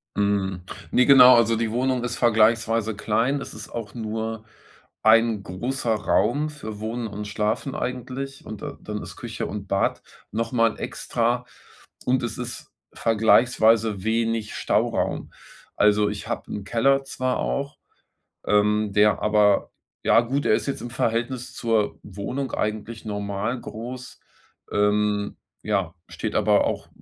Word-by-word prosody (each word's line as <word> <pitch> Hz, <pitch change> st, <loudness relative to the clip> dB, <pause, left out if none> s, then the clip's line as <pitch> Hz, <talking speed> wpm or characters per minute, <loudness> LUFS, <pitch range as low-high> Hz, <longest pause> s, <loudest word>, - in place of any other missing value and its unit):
Mhm, 100 Hz, -2 st, 0 dB, 0.3 s
ne, 125 Hz, -, +4 dB
genau, 130 Hz, -2 st, +9 dB
also, 115 Hz, -1 st, +4 dB
die 110 Hz, -1 st, -1 dB
Wohnung 125 Hz, +1 st, 0 dB
ist 120 Hz, 0 st, -3 dB
vergleichsweise 115 Hz, -1 st, +3 dB
klein. 115 Hz, +7 st, 0 dB
Es -, -, -7 dB
ist 110 Hz, -, -8 dB
auch 115 Hz, -2 st, -6 dB
nur 110 Hz, -1 st, -4 dB, 0.6 s
ein 115 Hz, -1 st, +4 dB
großer 115 Hz, +5 st, -2 dB
Raum 115 Hz, +8 st, +1 dB
für 110 Hz, -8 st, -8 dB
Wohnen 115 Hz, +2 st, -3 dB
und 105 Hz, 0 st, -6 dB
Schlafen 105 Hz, +6 st, -1 dB
eigentlich. 130 Hz, +2 st, -5 dB
Und 110 Hz, -2 st, -8 dB
da -, -, -6 dB
dann -, -, -5 dB
ist -, -, -9 dB
Küche -, -, -5 dB
und 100 Hz, -1 st, -6 dB
Bad 95 Hz, +1 st, 0 dB, 0.3 s
noch 115 Hz, +2 st, -2 dB
mal 115 Hz, -3 st, +2 dB
extra. 120 Hz, +1 st, -1 dB, 0.6 s
Und 130 Hz, +1 st, +1 dB
es 115 Hz, -, -4 dB
ist 120 Hz, -1 st, -6 dB, 0.2 s
vergleichsweise 110 Hz, -2 st, +3 dB
wenig 115 Hz, 0 st, -1 dB
Stauraum. -, -, 0 dB, 0.4 s
Also, 105 Hz, 0 st, +4 dB
ich 105 Hz, -1 st, -5 dB
habe -, -, -4 dB
'n 100 Hz, -, -5 dB
Keller 135 Hz, +7 st, +2 dB
zwar 130 Hz, -1 st, -2 dB
auch, 140 Hz, +2 st, -2 dB, 0.7 s
ähm, 105 Hz, +1 st, +2 dB
der 105 Hz, +1 st, +3 dB
aber 105 Hz, -1 st, +3 dB, 0.3 s
ja, -, -, +5 dB
gut, 135 Hz, +4 st, -2 dB
er -, -, +4 dB
ist -, -, -1 dB
jetzt 140 Hz, -, -3 dB
im 120 Hz, -, -6 dB
Verhältnis 120 Hz, +2 st, -2 dB
zur 115 Hz, -3 st, 0 dB
Wohnung 115 Hz, +8 st, -5 dB
eigentlich 110 Hz, +1 st, -3 dB
normal 105 Hz, +3 st, -3 dB
groß. 125 Hz, +3 st, -8 dB, 0.5 s
Ähm, 105 Hz, 0 st, +1 dB, 0.3 s
ja, 95 Hz, -5 st, -1 dB
steht -, -, -4 dB
aber -, -, +3 dB
auch -, -, -3 dB
115 Hz, 140 wpm, -24 LUFS, 105-120 Hz, 0.7 s, genau